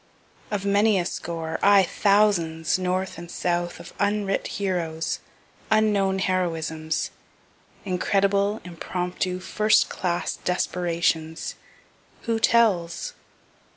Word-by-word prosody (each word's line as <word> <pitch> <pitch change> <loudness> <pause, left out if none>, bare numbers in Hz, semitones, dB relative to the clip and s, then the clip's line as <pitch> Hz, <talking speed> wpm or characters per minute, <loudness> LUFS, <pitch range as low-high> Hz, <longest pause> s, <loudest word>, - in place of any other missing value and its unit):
Of 200 -2 -2
many 205 +1 +4
a 175 - 0
score 165 -3 -4
aye, 200 -1 +6
thousands, 185 -6 +2
north 185 -1 -2
and 170 0 -9
south, 175 0 -2
of - - -11
unwrit 200 -1 0
heroes, 170 -5 -2 0.5
unknown 210 -3 +3
heroisms, 160 -4 -1 0.7
incredible, 200 +2 +1
impromptu, 180 +1 -3
first 215 +3 +3
class 175 -2 -2
desperations 170 -2 -1 0.7
who 230 -1 0
tells? 225 - +2
185 Hz, 90 wpm, -25 LUFS, 170-200 Hz, 0.7 s, aye